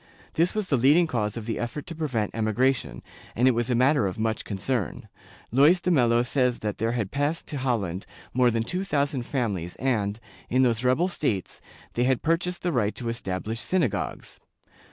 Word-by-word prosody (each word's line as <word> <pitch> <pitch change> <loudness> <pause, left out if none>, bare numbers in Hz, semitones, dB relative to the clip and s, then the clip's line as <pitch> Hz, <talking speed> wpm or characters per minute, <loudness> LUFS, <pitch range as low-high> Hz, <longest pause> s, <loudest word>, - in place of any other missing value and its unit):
This 170 +5 +2
was 215 -2 0
the 140 - +3
leading 145 +8 +5
cause 110 -8 -2
of 115 - -5
the 115 - -3
effort 120 +5 -4
to 170 - -7
prevent 130 -10 -1
emigration, 115 - 0 0.3
and 125 +2 +3
it - - +7
was 120 +1 -1
a 125 - +2
matter 130 -2 +3
of 95 - -5
much 110 0 -1
concern. 105 +1 -3 0.4
Luys 145 +9 +5
de 180 - 0
Melo 120 -6 +4
says 125 -1 +1
that 105 - -2
there 115 +1 0
had 110 -5 -2
passed 145 +4 -1
to 145 - -4
Holland 100 -9 -1 0.3
more 125 0 +4
than 115 -1 0
two 180 +10 -2
thousand 140 -8 -1
families 100 - -2
and, 110 -5 -1 0.3
in 130 +2 +3
those 120 -1 +1
rebel 130 +8 +3
states, 115 - -2 0.3
they 120 - +1
had 130 -1 +1
purchased 175 +2 0
the 175 - +1
right 110 -7 0
to 120 -2 -4
establish 110 0 -3
synagogues. 125 - -2
125 Hz, 190 wpm, -26 LUFS, 110-145 Hz, 0.4 s, it